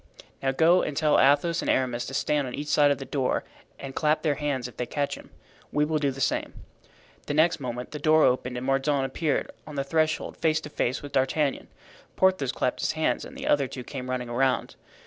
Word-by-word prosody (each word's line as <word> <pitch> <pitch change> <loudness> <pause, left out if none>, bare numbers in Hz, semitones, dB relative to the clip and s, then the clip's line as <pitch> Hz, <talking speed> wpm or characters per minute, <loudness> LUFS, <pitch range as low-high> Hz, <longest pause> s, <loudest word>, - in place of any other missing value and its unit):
"Now 135 - +1
go 165 +6 +4
and 145 - -3
tell 155 -2 +3
Athos 145 +5 +3
and - - -3
Aramis 125 -2 0
to 135 - -5
stand 145 -1 +1
on 125 - -5
each 145 +1 -5
side 145 -1 +5
of 140 - +2
the 135 - -7
door 135 0 -1 0.3
and 135 -1 -7
clap 155 +2 +1
their 155 -3 +2
hands 140 -4 -2
if 125 - -13
they 125 - -3
catch 145 +3 -2
him. - - -10 0.4
We 150 0 +2
will 155 0 0
do 145 -1 +1
the 135 0 -6
same." - - -1 0.7
The 145 - -1
next 160 +2 +3
moment 125 -2 -5
the 150 - -5
door 155 +1 +4
opened 125 0 +1
and 125 - -4
Mordaunt 135 +1 +1
appeared 150 +2 -1 0.2
on 150 - -8
the 140 - -1
threshold, 155 +2 0
face 160 -1 +2
to 150 - -9
face 130 +2 -1
with 145 - -8
D'Artagnan. 135 +2 0 0.5
Porthos 185 -9 +2
clapped - - -1
his - - 0
hands - - 0
and - - -11
the - - -6
other 140 -2 +2
two 125 0 -7
came 130 0 -7
running 125 -1 -2
around. 130 +2 0
140 Hz, 225 wpm, -26 LUFS, 130-150 Hz, 0.7 s, side